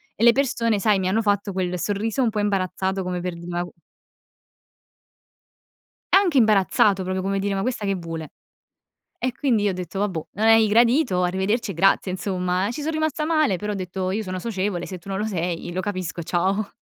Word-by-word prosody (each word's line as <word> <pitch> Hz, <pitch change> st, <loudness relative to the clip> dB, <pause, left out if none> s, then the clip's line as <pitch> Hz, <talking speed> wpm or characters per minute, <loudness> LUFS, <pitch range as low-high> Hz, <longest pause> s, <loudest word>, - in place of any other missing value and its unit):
e 225 Hz, -, -2 dB
le 235 Hz, -, +8 dB
persone, 230 Hz, -5 st, +1 dB
sai, 200 Hz, 0 st, +3 dB
mi 185 Hz, -, -1 dB
hanno 210 Hz, +4 st, +2 dB
fatto 205 Hz, -2 st, 0 dB
quel 180 Hz, -1 st, -2 dB
sorriso 210 Hz, +6 st, -1 dB
un 245 Hz, -, +3 dB
po' 210 Hz, -, -2 dB
imbarazzato, 190 Hz, -1 st, -1 dB
come 180 Hz, -1 st, -3 dB
per 180 Hz, 0 st, -3 dB
dire: 170 Hz, +1 st, -10 dB
“Ma 175 Hz, 0 st, -2 dB
c” 175 Hz, -, -8 dB, 2.4 s
Anche 375 Hz, -7 st, +5 dB
imbarazzato, 205 Hz, -3 st, +4 dB
proprio 185 Hz, +1 st, -2 dB
come 195 Hz, +1 st, -1 dB
dire: 200 Hz, +1 st, -1 dB
"Ma 195 Hz, -, -1 dB
questa 235 Hz, -2 st, -2 dB
che 195 Hz, -1 st, 0 dB
vuole?" 165 Hz, -3 st, -6 dB, 0.9 s
E 255 Hz, -, -1 dB
quindi 245 Hz, -6 st, +1 dB
io 205 Hz, -, +2 dB
ho -, -, -4 dB
detto: 180 Hz, +1 st, -5 dB
"Vabbò, 185 Hz, -6 st, -2 dB
non 220 Hz, +2 st, +1 dB
hai 225 Hz, -1 st, +6 dB
gradito 235 Hz, -, +3 dB
arrivederci 190 Hz, +5 st, 0 dB
e -, -, -6 dB
grazie", 190 Hz, +2 st, +2 dB
insomma, 185 Hz, 0 st, -1 dB
ci 295 Hz, -, -5 dB
son 315 Hz, -, -1 dB
rimasta 315 Hz, -1 st, -1 dB
male 310 Hz, -, +2 dB
però 210 Hz, +2 st, -3 dB
ho -, -, -4 dB
detto: 185 Hz, 0 st, -3 dB
"Io 215 Hz, +2 st, -2 dB
sono 185 Hz, -1 st, -4 dB
socievole, 190 Hz, -4 st, -2 dB
se 185 Hz, -, -7 dB
tu 180 Hz, +3 st, -13 dB
non 195 Hz, -, -2 dB
lo 210 Hz, -, -1 dB
sei, 175 Hz, -4 st, -3 dB
lo 185 Hz, -, -1 dB
capisco, 185 Hz, -4 st, -4 dB
ciao". 195 Hz, +5 st, 0 dB
195 Hz, 205 wpm, -23 LUFS, 185-220 Hz, 2.4 s, le